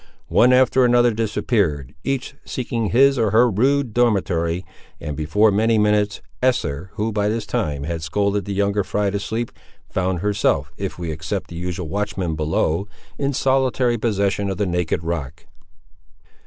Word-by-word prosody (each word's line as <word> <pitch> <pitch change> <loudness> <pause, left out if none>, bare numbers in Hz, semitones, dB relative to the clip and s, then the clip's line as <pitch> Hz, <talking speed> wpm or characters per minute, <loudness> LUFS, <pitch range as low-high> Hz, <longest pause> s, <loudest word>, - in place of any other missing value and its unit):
One 125 - +5
after 130 0 +4
another 120 -1 +4
disappeared, 105 - -1
each 135 0 -2
seeking 115 -3 -3
his 135 +2 +4
or 110 -2 +2
her 115 +4 +5
rude 130 +3 +1
dormitory; 95 -7 +1 0.3
and, 75 - -5
before 105 +9 +3
many 110 +3 +2
minutes, 105 -1 +1 0.2
Esther, 95 - 0
who 110 +1 -1
by 105 -1 0
this 110 0 -2
time 75 -8 -2
had 80 +1 -3
scolded 100 +4 0
the 100 - -3
younger 100 +1 +1
fry 100 +1 -1
to 100 - -1
sleep, 110 +3 -3 0.4
found 95 -2 -1
herself, 95 -9 +1
if 95 -1 -5
we 85 -2 -4
except 80 +6 -4
the - - -7
usual 90 0 -4
watchman 95 -3 -2
below, 80 +4 0 0.3
in 140 0 0
solitary 130 -3 +1
possession 100 -2 0
of 95 - -3
the 105 - 0
naked 90 -2 -1
rock. 80 -2 -4
100 Hz, 155 wpm, -21 LUFS, 85-115 Hz, 0.4 s, One